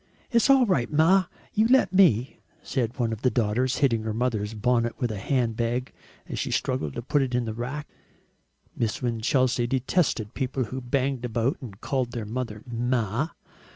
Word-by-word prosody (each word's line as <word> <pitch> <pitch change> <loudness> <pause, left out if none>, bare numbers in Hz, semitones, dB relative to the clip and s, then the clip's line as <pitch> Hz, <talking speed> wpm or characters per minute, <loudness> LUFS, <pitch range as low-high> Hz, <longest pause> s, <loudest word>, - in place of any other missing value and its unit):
"It's 235 +2 +3
all 270 -2 +6
right, 135 - +1
Ma, 175 +5 +4 0.3
you 215 +2 +3
let 260 -4 +4
me," 140 - +4 0.2
said 125 -2 -2
one 115 -3 0
of 110 - -7
the 130 - +3
daughters, 125 +2 0
hitting 115 -4 +1
her 110 -1 -3
mother's 110 -3 -1
bonnet 120 +1 +1
with 120 -2 0
a 105 - -4
handbag 120 +1 -1 0.4
she - - -2
struggled 75 - -1
to - - -4
put 145 +3 +2
in 125 -1 0
the 110 - -3
rack. 130 +6 -5 0.9
Miss 115 +1 -2
Winchelsea 120 +1 +1
detested 130 - 0
people 130 -1 -1
who 130 +3 -5
banged 130 0 -1
about 120 +2 0
and 105 -6 -9
called 130 -3 -1
their 115 -3 -4
mother 110 -1 -4
"Ma." 120 - -1
125 Hz, 165 wpm, -26 LUFS, 115-135 Hz, 0.9 s, all